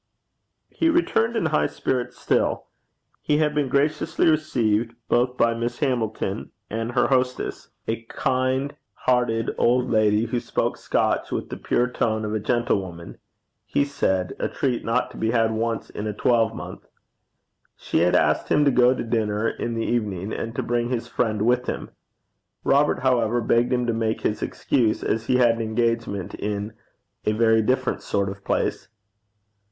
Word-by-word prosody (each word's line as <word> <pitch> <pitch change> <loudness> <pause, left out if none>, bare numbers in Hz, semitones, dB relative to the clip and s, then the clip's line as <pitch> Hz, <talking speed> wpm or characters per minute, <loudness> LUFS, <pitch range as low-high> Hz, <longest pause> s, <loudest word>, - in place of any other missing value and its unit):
He 330 - +1
returned 240 -9 +2
in 225 - 0
high 155 -1 +2
spirits 125 -2 -2
still. - - 0 0.6
He 150 - +1
had 150 -1 +2
been 145 -3 0
graciously 150 +5 +1
received 120 -8 +1
both 125 +1 +1
by 115 0 +3
Miss 115 +1 -3
Hamilton 110 -7 -2 0.2
and 115 +2 -3
her 125 - +3
hostess 125 -1 -1 0.2
a 115 +1 -2
kind 130 +3 -1 0.3
hearted 120 -3 +2
old 125 +1 +2
lady, 110 0 +3
who 120 +2 -1
spoke - - -2
Scotch - - 0
with - - -3
the - - -3
pure 125 - +1
tone 110 -3 -1
of 105 - -3
a 110 - 0
gentlewoman, 95 -7 -2 0.4
he 140 - 0
said 95 -10 -1
a - - 0
treat 125 -4 -1
not 115 +3 0
to - - -12
be 110 - 0
had 115 -1 +2
once 115 +1 -2
in 105 - -4
a 105 - -2
twelvemonth. 115 -1 0 0.9
She - - -1
had 90 +1 +3
asked 75 -1 +2
him 150 - +4
to 140 - +5
go 125 0 +4
to - - -3
dinner 110 -1 0
in 115 - -4
the 115 - -1
evening, 105 -4 -2
and 115 +1 -4
to - - -1
bring 120 0 0
his 120 -1 -2
friend 110 -4 0
with 125 +2 +2
him. - - -4 0.7
Robert, 145 +2 +3
however, 120 -3 +2
begged 120 +2 +2
him 125 -1 +1
to 120 - 0
make 110 -1 -1
his 105 - -1
excuse, 115 -5 0
as 110 0 -1
he 125 - +3
had 120 -2 +4
an - - -3
engagement 110 -4 -1
in 105 +1 -3 0.5
a 105 - +2
very 110 0 +4
different 130 +3 0
sort 100 -1 -1
of 100 0 -9
place. - - -1
115 Hz, 170 wpm, -24 LUFS, 110-125 Hz, 0.9 s, to